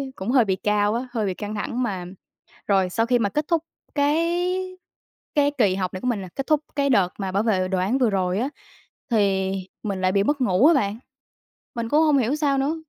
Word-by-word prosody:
cũng 190 +4 -5
hơi 250 -3 +5
bị 190 -2 +1
cao 210 +1 +1
á, 245 +3 -3
hơi 225 -4 -1
bị 190 - -1
căng 210 +3 -6
thẳng 240 +4 -2
mà 190 -6 -3 0.6
Rồi, 190 -2 +2
sau 225 +5 0
khi 245 0 +2
mà 205 -3 +1
kết 300 +7 -2
thúc 335 -2 +1 0.3
cái 350 +5 0 0.6
cái 290 -1 +3
kỳ 205 -7 +3
học 185 -2 -2
này 185 - -6
của - - -3
mình 230 -5 0
nè, 185 - -7
kết 275 - -4
thúc 305 -1 +3 0.2
cái 280 -1 +1
đợt 200 -8 +3
mà 190 -2 -3
bảo 200 +3 +1
vệ 190 -5 +1
đồ 190 0 -1
án 200 +8 +1
vừa 250 -4 +3
rồi 185 -1 0
á, 255 +4 -1 0.6
thì 195 -4 +2 0.3
mình 200 -3 -3
lại 185 0 +2
bị 200 0 +2
mất 285 +5 0
ngủ 205 +3 +4
á 335 - +6
bạn. 215 -7 0 0.8
Mình 230 -1 -3
cũng 300 +4 +4
hông 300 -3 +4
hiểu 255 +2 +1
sao 290 -2 +1
nữa, 280 +4 0
225 Hz, 235 wpm, -23 LUFS, 195-280 Hz, 0.8 s, á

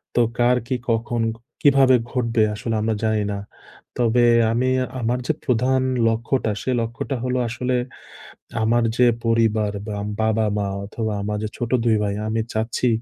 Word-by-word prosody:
তো 120 - +4 0.2
কার 125 +1 +4
কি 130 - 0
কখন 115 +1 0
ক - - -16 0.2
কীভাবে 135 -4 +5 0.2
ঘটবে? 115 -3 +1
আসলে 115 +2 -3
আমরা 110 0 0
জানি 110 -1 +1
না। 100 - -3 0.6
তবে 120 0 +3 0.3
আমি 125 +3 +1 0.3
আমার 120 +1 0
যে - - +2
প্রধান 130 +1 +2 0.3
লক্ষ্যটা, 115 +1 0
সে 130 - -1
লক্ষ্যটা 115 +4 -3
হলো 130 0 -1
আসলে 125 +2 -1 0.9
আমার 120 +2 +3
যে 125 - +5 0.2
পরিবার 110 -2 +2 0.2
বা 105 - -3 0.2
বাবা-মা 110 -2 +1 0.2
অথবা, 110 +2 -3
আমার 105 +1 -2
যে - - -1
ছোট 120 -1 -4
২ 115 -2 +3
ভাই, 100 -1 -1
আমি 110 +1 0
চাচ্ছি 115 +3 0
115 Hz, 155 wpm, -22 LUFS, 110-125 Hz, 0.9 s, কীভাবে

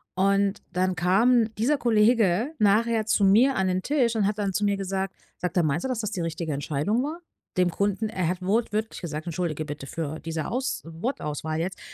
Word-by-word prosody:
Und 200 +1 +2
dann 185 +1 +1
kam 225 +6 +3
dieser 255 +8 +2
Kollege 225 - +3
nachher 220 +2 +3
zu 205 -1 +3
mir 235 +8 +5
an 190 0 +1
den 185 0 0
Tisch 250 -4 +1
und 215 -3 +2
hat 210 +1 -1
dann 200 -2 -1
zu 210 - 0
mir 200 -1 +1
gesagt 195 0 -3 0.2
sagt 180 0 -3
er: 175 - +4
„Meinst 155 +2 0
du, - - -1
dass 245 -3 -1
das 215 -1 -3
die 190 -5 -3
richtige 165 -1 -3
Entscheidung 150 - -1
war? 310 +4 -4 0.4
Dem 180 -1 +4
Kunden“ 200 +4 0
er 185 -6 -1
hat 180 +2 -2
wortwörtlich 215 +2 -1
gesagt 155 -2 -5
Entschuldige 160 -2 -2
bitte 145 -2 -7
für 155 0 -4
diese 160 -1 -4
Aus 260 +3 -2
Wortauswahl 160 - -3
jetzt: 180 +3 -3
195 Hz, 200 wpm, -26 LUFS, 170-225 Hz, 0.4 s, mir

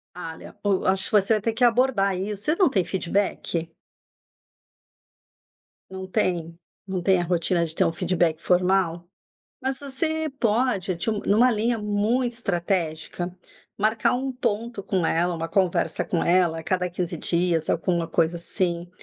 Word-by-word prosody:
Olha, 165 -2 -8
o 205 -1 +2
eu 190 - -1
acho 190 +1 +2
que - - -3
você 205 +1 +4
vai 215 - +1
ter 225 +2 -1
que 240 +3 -1
abordar 235 -5 +3
isso 200 +2 -4
você 310 - +2
não 365 -3 +4
tem 195 -8 +1
feedback? 180 -3 -1 2.2
Não 190 0 -6
tem? 170 -3 -1 0.3
Não 190 -2 -2
tem 190 0 +4
a - - -1
rotina 170 0 +1
de 160 -1 -7
ter - - +3
um - - +2
feedback 170 -1 0
formal? 180 -1 +2 0.6
Mas 265 +1 -1
você 315 +3 -2
pode, 220 -5 +1
tip 195 +7 0
numa 235 +5 +5
linha 230 +1 0
muito 215 +4 0
estratégica, 175 -4 -2 0.4
marcar 215 +3 +2
um 265 +2 -2
ponto 230 -3 -3
com 185 -3 0
ela, 175 +2 +1
uma 165 0 -4
conversa 185 +1 +1
com 170 - -1
ela, 170 -2 +2
a - - -10
cada 180 +2 0
15 175 0 -3
dias, 170 0 +1
alguma 170 0 0
coisa 165 +1 +1
assim, 170 0 -2
190 Hz, 160 wpm, -24 LUFS, 170-220 Hz, 2.2 s, numa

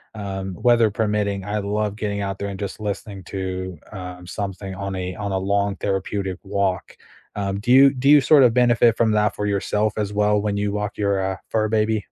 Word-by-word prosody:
um, 95 -2 -5
weather 120 -3 +4
permitting, 105 -2 -1
I 105 +1 -2
love 105 +1 -2
getting 105 -1 -3
out 100 0 -3
there 100 - -3
and 95 -1 -7
just 100 +1 -5
listening 100 -1 -5
to, 95 -2 -4
um, 90 -2 -8
something 95 +1 -5
on 100 0 -4
a 90 0 -4
on 100 -2 -4
a 95 - 0
long 100 +1 0
therapeutic 95 -1 -2
walk. 100 -2 -2 0.4
Um, 100 -1 -2
do 120 +3 0
you 135 +1 +7
do 135 +2 +1
you 150 - +8
sort 140 +1 +6
of 120 -2 +5
benefit 120 -2 +4
from 115 -2 +3
that 105 -1 +1
for 105 - -2
yourself 105 +1 0
as 105 -2 -1
well 105 0 +2
when 100 -1 -1
you 100 0 -1
walk 105 0 -3
your, 100 -2 +1
uh, 95 0 -2
fur 110 -1 0
baby? 110 0 +1
100 Hz, 210 wpm, -22 LUFS, 95-105 Hz, 0.4 s, you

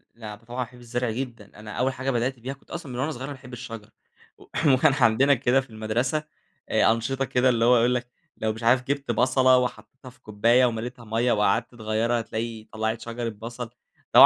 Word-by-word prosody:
لا 110 -3 -8
ده 105 - -22
طبعًا 120 +2 -9
باحب 125 +1 -16
الزرع 120 0 -2
جدًا، 120 -3 -5
أنا 110 0 -9
أول 130 +4 0
حاجة 130 +1 -2
بدأت 125 +1 -1
بيها 130 +3 -5
كنت 140 - -20
أصلًا 170 -6 -6
من 125 - -5
وأنا 145 +4 0
صغير 130 -4 -8
وأنا 145 - -4
باحب 125 -2 -13
الشجر، 115 -3 -8 0.5
و - - -16 0.3
وكان 130 +2 +4
عندنا 135 +1 +4
كده 130 0 +2
في 135 - -15
المدرسة 115 +7 -1 0.5
آآ - - +4
أنشطة 130 +4 -1
كده 130 0 +2
اللي 115 -2 +2
هو 125 0 +6
يقول 120 +2 +3
لك 125 0 -3 0.3
لو 110 0 -1
مش 115 - -9
عارف 125 +2 +4
جِبت 140 -1 -2
بصلة 130 +2 +4
وحطّيتها 125 +1 -4
في 125 - -21
كوباية 115 +4 +3
ومليتها 120 +1 -3
ميّة، 115 +3 +1
وقعدت 105 +3 +1
تغيرها 115 +1 0
هتلاقي 115 0 -4
طلّعت 110 +1 -2
شجرة 115 0 -4
بصل، 115 +3 -7
اللي 120 +1 +4
120 Hz, 205 wpm, -25 LUFS, 115-130 Hz, 0.5 s, هو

